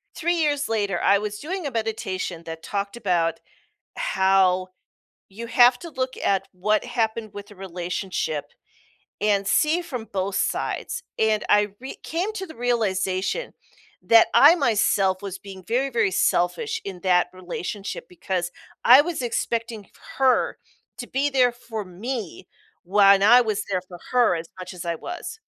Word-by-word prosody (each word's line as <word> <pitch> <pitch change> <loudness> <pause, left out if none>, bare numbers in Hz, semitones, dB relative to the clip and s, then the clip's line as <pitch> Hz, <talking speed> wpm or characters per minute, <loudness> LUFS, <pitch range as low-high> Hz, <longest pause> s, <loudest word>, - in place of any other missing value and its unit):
3 345 +1 0
years 295 -3 +1
later, 205 -5 0
I 200 - +5
was 210 0 -4
doing 350 0 -4
a - - -5
meditation 215 -6 -3
that 165 0 -8
talked 200 +2 -3
about 175 -7 0 0.6
how 190 -1 +2 0.6
you 230 +4 -8
have 245 +2 +5
to 340 - -8
look 255 -2 -2
at 195 -1 +1
what 210 +5 0
happened 225 -3 -2
with 205 0 -8
the 205 - -15
relationship 180 -4 -3 0.8
and 200 -2 +1
see 315 - +2
from 250 -10 -6
both 190 0 -2
sides, - - -2 0.2
and 220 -1 +2
I 210 0 +4
re 265 - -7
came 360 +7 -2
to 380 -3 -5
the 320 - -12
realization 220 - -1 0.5
that 230 -1 +6
I 300 +5 +8
myself 205 - +2
was 195 -1 -5
being 190 -2 -11
very, 255 +4 +1
very 230 -6 +1
selfish 435 - 0
in 185 -2 -6
that 180 -2 +3
relationship 185 +2 -6
because 180 -1 -3 0.3
I 255 +4 +9
was 335 -3 -3
expecting 230 -3 -2
f - - -30 0.3
her 265 -1 +2 0.4
to - - -6
be 280 +2 0
there 255 -3 +3
for 225 -4 -7
me 195 0 -6 0.4
when 200 +1 +5
I 240 +4 +8
was 215 -3 -1
there 185 -1 0
for 175 - -10
her 240 -8 +4
as 165 0 -6
much 185 +1 -7
as 175 - -8
I 170 -1 -1
was, 355 - -7
210 Hz, 155 wpm, -24 LUFS, 190-250 Hz, 0.8 s, I